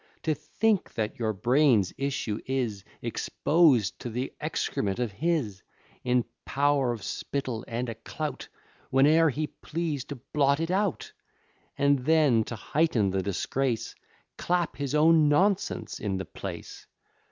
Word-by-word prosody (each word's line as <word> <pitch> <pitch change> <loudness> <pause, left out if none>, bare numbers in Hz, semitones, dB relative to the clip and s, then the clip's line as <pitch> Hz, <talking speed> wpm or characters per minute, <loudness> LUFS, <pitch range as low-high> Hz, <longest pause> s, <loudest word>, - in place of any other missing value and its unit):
To 160 - +2
think 200 +8 0
that 110 +1 -2
your 110 -2 +1
brains' 120 -1 +3
issue 135 -6 -2
is 120 -7 -2 0.2
Exposed 145 - +2
to 125 - -5
th'excrement 110 -4 -2
of 120 -3 -1
his, 120 - -1 0.4
In 125 -1 +2 0.2
pow'r 140 -2 +2
of 115 -4 -5
spittle 130 -5 -3
and 120 +2 -3
a 115 - -3
clout, - - -5 0.4
Whene'er 155 +5 +5
he 150 +3 -1
please, 155 -3 -4
to 145 - -6
blot 140 +3 +1
it 165 +2 -1
out; 195 -1 -1 0.7
And 140 0 +3
then, 140 -5 +3
to 120 - -5
heighten 115 -4 +1
the 95 0 0
disgrace, 115 +5 -1 0.5
Clap 175 -1 0
his 140 0 -2
own 155 0 +5
nonsense 195 +6 +1
in 100 -2 -2
the 95 - -4
place. - - -8
135 Hz, 135 wpm, -27 LUFS, 115-155 Hz, 0.7 s, Whene'er